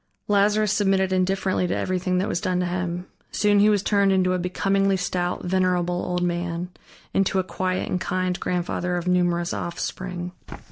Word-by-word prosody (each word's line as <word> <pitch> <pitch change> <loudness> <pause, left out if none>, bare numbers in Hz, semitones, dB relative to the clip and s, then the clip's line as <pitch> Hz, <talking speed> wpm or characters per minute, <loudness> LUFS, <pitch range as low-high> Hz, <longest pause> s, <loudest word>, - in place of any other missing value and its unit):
Lazarus 210 +1 +3
submitted 195 -2 +2
indifferently 185 0 +1
to - - -1
everything 185 0 -1
that 185 - 0
was 170 - -1
done 180 -1 0
to 180 - 0
him. 180 0 -3 0.3
Soon 205 -1 +3
he 210 +1 +6
was 205 -2 +2
turned 200 -2 +3
into 185 -1 +2
a 180 - 0
becomingly 195 +2 +1
stout, 180 -1 -2
venerable 180 -1 +1
old 180 0 -1
man, 175 0 -2 0.4
into 195 0 +2
a 190 - +2
quiet 185 0 -2
and 180 - -2
kind 185 -1 -1
grandfather 180 0 -1
of 175 0 -4
numerous 175 -1 +1
offspring. 180 +1 -4
185 Hz, 170 wpm, -24 LUFS, 180-190 Hz, 0.4 s, he